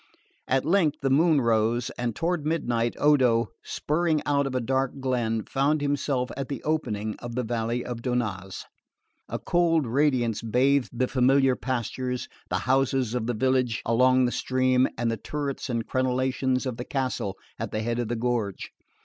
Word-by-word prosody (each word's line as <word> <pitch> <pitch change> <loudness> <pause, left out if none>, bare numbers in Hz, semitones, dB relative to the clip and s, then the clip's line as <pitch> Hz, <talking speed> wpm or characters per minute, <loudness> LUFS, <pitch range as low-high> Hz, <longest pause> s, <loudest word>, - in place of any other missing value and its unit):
At 135 +1 +1
length 160 -3 +2
the 135 - +2
moon 155 +1 +4
rose, 115 0 +1
and 120 -2 -3
toward 170 -2 -1
midnight 120 -7 0
Odo, 125 -6 +3
spurring 155 0 0
out 140 -1 +2
of 130 - -4
a - - +2
dark 130 +3 -1
glen, 120 -4 0
found 140 +3 +1
himself 140 -3 -1
at 135 0 -4
the 140 - -5
opening 110 -9 -1
of 120 -1 -7
the 125 - 0
valley 120 +1 -2
of 120 -2 -5
Donnaz. 110 -7 -3 0.7
A - - -2
cold 165 -4 +2
radiance 125 -3 +1
bathed 125 +4 +2
the 125 +1 0
familiar 135 +1 +3
pastures, 125 0 -3 0.2
the - - 0
houses 130 -2 +1
of 120 -2 -2
the 120 - -1
village 130 -1 +1
along 130 +2 +4
the 120 - 0
stream, 130 0 +2
and 115 0 0
the 115 - -2
turrets 145 0 -4
and 115 -2 -1
crenellations 130 0 0
of 125 -3 -3
the 120 - -4
castle 130 -8 -2 0.2
at - - -3
the 110 - -3
head 120 +1 -1
of 120 - -1
the 120 - -2
gorge. 115 -4 -2
130 Hz, 170 wpm, -26 LUFS, 120-140 Hz, 0.7 s, moon